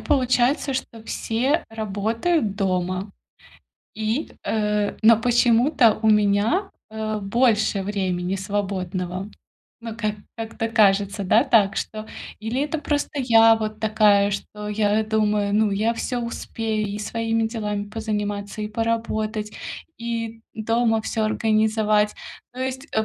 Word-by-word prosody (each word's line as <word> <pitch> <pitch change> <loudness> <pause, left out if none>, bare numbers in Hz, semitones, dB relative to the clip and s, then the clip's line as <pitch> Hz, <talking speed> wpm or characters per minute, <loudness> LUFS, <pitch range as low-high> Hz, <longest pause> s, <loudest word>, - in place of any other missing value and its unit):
получается, 260 +1 +1
что 230 -3 -5
все 250 +7 -1
работают 220 - -1
дома. 185 0 -1 0.8
И, 220 +7 -2
э, 210 -1 0
но 225 0 +7
почему-то 240 0 +4
у 220 - +3
меня, 210 - +2 0.2
э, 215 0 -3
больше 215 -1 +2
времени 190 -2 -1
свободного. 190 -1 -3 0.5
Ну, 230 -1 -6
как 215 -2 -2 0.2
как-то 225 0 -4
кажется, 200 -2 +2
да, 220 +6 +5
так 215 -7 +3
что. 215 0 -4 0.3
Или 225 +5 -2
это 295 +2 -1
просто 290 -1 -1
я 225 -3 +6
вот 215 -1 -4
такая, 210 -2 +4
что 210 +1 -5
я 210 +1 +1
думаю: 210 -2 +1
"Ну, 215 -1 +3
я 215 +4 +1
всё 245 +1 -2
успею: 225 -2 -3
и 205 +1 -4
своими 225 +1 -1
делами 210 -3 -3
позаниматься, 210 -1 -3
и 210 - -3
поработать, 220 -1 -2 0.4
и 230 -1 -4
дома 225 +1 +1
всё 220 0 -2
организовать". 215 -1 +2 0.4
То 255 - -8
есть, 260 +1 -3
э, 220 0 +1
220 Hz, 125 wpm, -23 LUFS, 205-230 Hz, 0.8 s, но